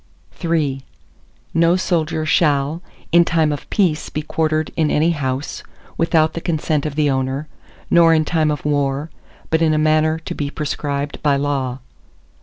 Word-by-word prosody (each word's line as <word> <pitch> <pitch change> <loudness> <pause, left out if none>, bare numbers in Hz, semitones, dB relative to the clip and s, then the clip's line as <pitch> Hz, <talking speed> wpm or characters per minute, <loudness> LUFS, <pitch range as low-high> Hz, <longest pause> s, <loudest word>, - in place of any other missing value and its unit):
ARTICLE 170 -1 -3
III 135 -4 -1 0.7
No 165 +1 +4
soldier 160 -4 -1
shall, 150 0 +2 0.3
in 170 +1 +6
time 160 -2 +1
of 145 - -6
peace, 175 -7 +1
be 150 - -4
quartered 155 0 -1
in 155 -2 +1
any 160 +3 +2
house, 135 -2 -3 0.3
without 160 -1 +2
the 170 - -5
consent 155 -3 -1
of 145 - -6
the 150 -1 +2
owner, 135 +2 -1 0.4
nor 170 -1 +6
in 155 -1 +3
time 160 -2 +1
of 150 -2 -3
war, 145 +1 0 0.4
but 160 0 +2
in 155 -1 +3
a - - +1
manner 155 +1 +2
to 160 - -6
be 145 -1 -3
prescribed 145 -1 -3
by 145 -2 +3
law. 135 -2 -2
155 Hz, 165 wpm, -19 LUFS, 145-160 Hz, 0.7 s, in